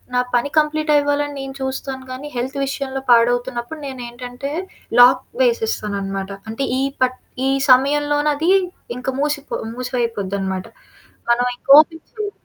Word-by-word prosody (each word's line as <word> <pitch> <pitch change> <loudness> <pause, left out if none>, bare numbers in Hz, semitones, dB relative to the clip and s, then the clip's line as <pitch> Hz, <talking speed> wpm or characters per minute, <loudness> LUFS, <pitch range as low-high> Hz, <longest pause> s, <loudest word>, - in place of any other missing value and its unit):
నా - - +4 0.2
పని 245 +4 +1
కంప్లీటవ్వాలని 290 -1 +1
నేను 270 0 -7
చూస్తాను 265 0 -4
కానీ, 260 +3 -6
హెల్త్ 260 +3 -3
విషయంలో 270 -1 -4
పాడవుతున్నప్పుడు 245 +4 +2
నేనేంటంటే, 245 +1 -6 0.5
లాక్ 250 +1 +7 0.2
వేసేస్తాననమాట, 200 -4 -1 0.2
అంటే, 225 +5 -3 0.2
ఈ - - +1 0.2
పట్ 255 0 +2 0.3
ఈ - - +2 0.2
సమయంలోనదీ 290 +3 +3 0.5
ఇంక 250 - -8
మూసిపో 290 0 -2 0.2
మూసివయిపోద్దనమాట. 205 -7 -2 0.7
మనవింక 245 +1 0
ఓపెన్ 325 +1 +2
చెయ్యం. 425 -3 -4
260 Hz, 110 wpm, -20 LUFS, 240-290 Hz, 0.7 s, లాక్